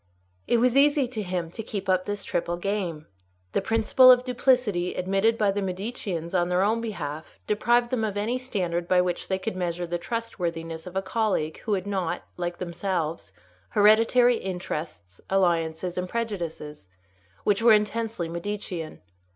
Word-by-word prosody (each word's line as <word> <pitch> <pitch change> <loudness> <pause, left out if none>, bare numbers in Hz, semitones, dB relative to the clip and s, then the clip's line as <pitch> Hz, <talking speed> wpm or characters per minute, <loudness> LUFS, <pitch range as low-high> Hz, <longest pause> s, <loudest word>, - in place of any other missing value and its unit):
It 240 - +3
was 245 +1 +3
easy 285 -1 +4
to 235 -3 -4
him 180 -4 -3
to 225 - -6
keep 205 -3 -5
up 185 -1 +2
this 205 -1 -3
triple 175 0 -2
game. 175 -5 -3 0.5
The - - +1
principle 225 +5 +5
of 250 0 +7
duplicity 250 -8 +1
admitted 195 +5 +1
by 210 -3 +3
the 200 +1 -2
Mediceans 190 -3 -4
on 175 -1 +2
their 180 +1 +2
own 220 +3 +1
behalf 155 -9 -6
deprived 240 +3 +2
them 245 -3 0
of 205 -2 -2
any 230 +5 -1
standard 175 -9 -2
by 185 0 +4
which 180 -1 -1
they 190 - 0
could 190 +2 -4
measure 175 -1 -2
the 175 0 -3
trustworthiness 170 -6 -4
of 180 - -9
a 190 - 0
colleague 190 -6 -1
who 210 - +1
had 185 -1 -3
not, 190 -4 -2
like 175 -1 -3
themselves, 170 - -3 0.4
hereditary 225 +4 +5
interests, 155 - -6
alliances, 175 -2 +1
and 180 0 -4
prejudices, 170 - -4 0.5
which 205 +1 +2
were 230 -1 +7
intensely 215 -3 0
Medicean. 170 -1 -5
190 Hz, 160 wpm, -26 LUFS, 175-225 Hz, 0.5 s, of